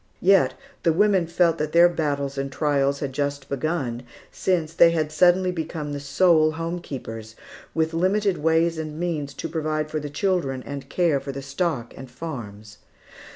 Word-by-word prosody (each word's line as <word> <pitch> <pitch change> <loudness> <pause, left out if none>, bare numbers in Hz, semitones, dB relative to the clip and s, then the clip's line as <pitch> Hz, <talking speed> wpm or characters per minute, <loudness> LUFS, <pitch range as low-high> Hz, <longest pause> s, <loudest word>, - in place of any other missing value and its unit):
Yet 195 0 +4 0.3
the 165 - +3
women 195 -1 +3
felt 170 -1 +2
that 155 0 -2
their 170 +1 +7
battles 145 -5 -2
and 135 0 -3
trials 140 -1 +1
had 140 -2 -3
just 140 0 -2
begun, 140 -4 -2 0.3
since 165 -4 -1
they 170 0 +7
had 155 -2 -1
suddenly 180 +3 +4
become 160 -3 -4
the 145 - -3
sole 155 +2 +3
home 165 +2 -3
keepers, 115 -7 -8 0.4
with 160 0 0
limited 190 +3 +1
ways 160 +1 +2
and 155 0 -5
means 160 -5 -2
to - - -4
provide 155 -1 -2
for 155 - -1
the 145 0 -6
children 145 -6 -1
and 140 -1 -7
care 170 -6 +2
for 140 - -6
the 135 0 -7
stock 140 -3 -2
and 130 - -10
farms. 110 -7 -8
155 Hz, 170 wpm, -24 LUFS, 140-170 Hz, 0.4 s, their